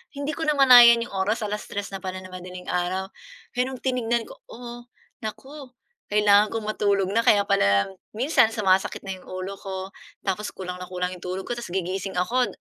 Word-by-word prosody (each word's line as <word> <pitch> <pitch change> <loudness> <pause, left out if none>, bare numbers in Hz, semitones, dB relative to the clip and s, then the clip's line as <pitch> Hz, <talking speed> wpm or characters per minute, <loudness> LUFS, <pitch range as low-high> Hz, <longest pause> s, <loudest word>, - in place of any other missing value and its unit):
Hindi 285 +1 -3
ko 320 +1 -4
namalayan 245 -5 +8
'yong 240 - -10
oras, 200 +3 -1
3:00 205 -1 -4
na 195 - -5
pala 185 0 -6
ng 185 - -11
madaling 180 0 -9
araw. 185 +2 -2 0.4
Kaya 250 - +1
nong 260 -2 -8
tinignan 240 -2 0
ko, - - -13
"Oh, 240 0 -10 0.3
naku, 265 +6 -8 0.4
kailangan 210 0 +5
kong 225 0 -4
matulog 200 -2 0
na." 225 - +2
Kaya 205 -1 +6
pala 100 - +2 0.2
minsan 230 -2 +3
sumasakit 195 -3 +1
na 190 -1 -6
'yong - - -19
ulo 185 +2 -6
ko, 190 0 -6 0.3
tapos 205 +2 -2
kulang 180 -1 -6
na 180 - -7
kulang 180 0 -3
'yong 180 - -8
tulog 185 +1 -3
ko, - - -7
tapos 235 -7 -8
gigising 190 +1 -3
ako 240 +8 +1
200 Hz, 185 wpm, -24 LUFS, 185-235 Hz, 0.4 s, namalayan